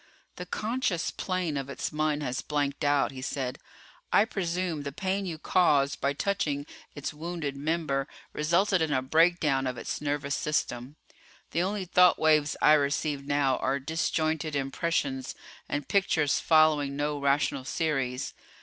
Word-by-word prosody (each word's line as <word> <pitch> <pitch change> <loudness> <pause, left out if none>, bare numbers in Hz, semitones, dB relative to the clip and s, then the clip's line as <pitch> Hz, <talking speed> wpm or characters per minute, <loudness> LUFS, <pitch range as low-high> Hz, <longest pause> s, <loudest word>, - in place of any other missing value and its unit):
"The - - -6
conscious 215 -6 -1
plane 180 -5 -2
of 135 0 -4
its 140 - -4
mind 150 -1 0
has 125 -2 -2
blanked 145 -1 -2
out," 145 -1 +2
he 130 -1 -8
said. 130 -2 -3 0.5
"I 210 - +5
presume 180 -5 -2
the 140 0 -5
pain 190 +5 -2
you 165 -3 -4
caused 145 -4 +2
by 140 +1 +1
touching 145 -4 -1 0.3
its 145 0 -4
wounded 160 -2 -4
member 145 -2 -1 0.3
resulted 175 +5 +2
in 160 -2 0
a 130 -2 +1
breakdown 155 -2 +3
of 125 -1 -3
its - - -4
nervous 145 -1 -1
system. 135 -3 -2 0.6
The 170 - +1
only 195 +1 -1
thought 180 0 +5
waves 155 -2 +3
I 150 - +7
receive 145 -1 0
now 140 -3 +2
are 135 +2 0
disjointed 155 +1 -1
impressions 135 -2 -1 0.3
and 145 -1 -2
pictures 160 -7 +2
following 155 -3 +3
no 145 0 -1
rational 140 -1 +1
series. 135 -4 -2
150 Hz, 150 wpm, -28 LUFS, 140-165 Hz, 0.6 s, I